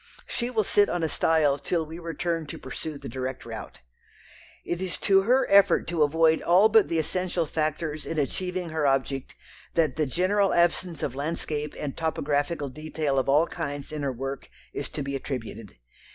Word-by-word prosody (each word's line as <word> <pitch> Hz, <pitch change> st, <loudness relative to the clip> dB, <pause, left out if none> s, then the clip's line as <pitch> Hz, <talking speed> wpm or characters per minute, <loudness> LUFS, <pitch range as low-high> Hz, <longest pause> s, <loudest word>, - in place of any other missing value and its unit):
She 240 Hz, 0 st, -2 dB
will 225 Hz, -4 st, +1 dB
sit 205 Hz, +1 st, +3 dB
on 175 Hz, -, -1 dB
a -, -, +2 dB
stile 150 Hz, -3 st, +2 dB
till 165 Hz, +2 st, -1 dB
we 160 Hz, +2 st, -8 dB
return 165 Hz, -1 st, -3 dB
to -, -, -7 dB
pursue 155 Hz, -2 st, -6 dB
the 140 Hz, -1 st, -9 dB
direct 130 Hz, +1 st, -5 dB
route. -, -, -8 dB, 0.8 s
It 175 Hz, +1 st, -2 dB
is 185 Hz, -2 st, -2 dB
to 195 Hz, -1 st, +5 dB
her 250 Hz, +6 st, +3 dB
effort 200 Hz, 0 st, +5 dB
to 170 Hz, -2 st, -1 dB
avoid 160 Hz, +2 st, +4 dB
all 185 Hz, +5 st, +5 dB
but 220 Hz, -1 st, +5 dB
the 165 Hz, -, -1 dB
essential 175 Hz, +2 st, -1 dB
factors 155 Hz, 0 st, -2 dB
in 165 Hz, -, -4 dB
achieving 180 Hz, +4 st, -2 dB
her 155 Hz, -2 st, 0 dB
object 135 Hz, 0 st, -1 dB, 0.4 s
that 155 Hz, -5 st, +2 dB
the 155 Hz, -2 st, +1 dB
general 190 Hz, +7 st, +2 dB
absence 175 Hz, -1 st, +1 dB
of 130 Hz, -, -1 dB
landscape 150 Hz, +1 st, -3 dB
and 145 Hz, -2 st, -4 dB
topographical 145 Hz, -1 st, -1 dB
detail 155 Hz, 0 st, -1 dB
of 135 Hz, -, -1 dB
all 150 Hz, +4 st, +5 dB
kinds 145 Hz, -5 st, -5 dB
in 155 Hz, -1 st, -4 dB
her 140 Hz, -1 st, 0 dB
work 135 Hz, +2 st, -5 dB, 0.2 s
is -, -, -4 dB
to 145 Hz, -, -4 dB
be 140 Hz, 0 st, -3 dB
attributed. 115 Hz, -, -6 dB
155 Hz, 180 wpm, -26 LUFS, 140-175 Hz, 0.8 s, to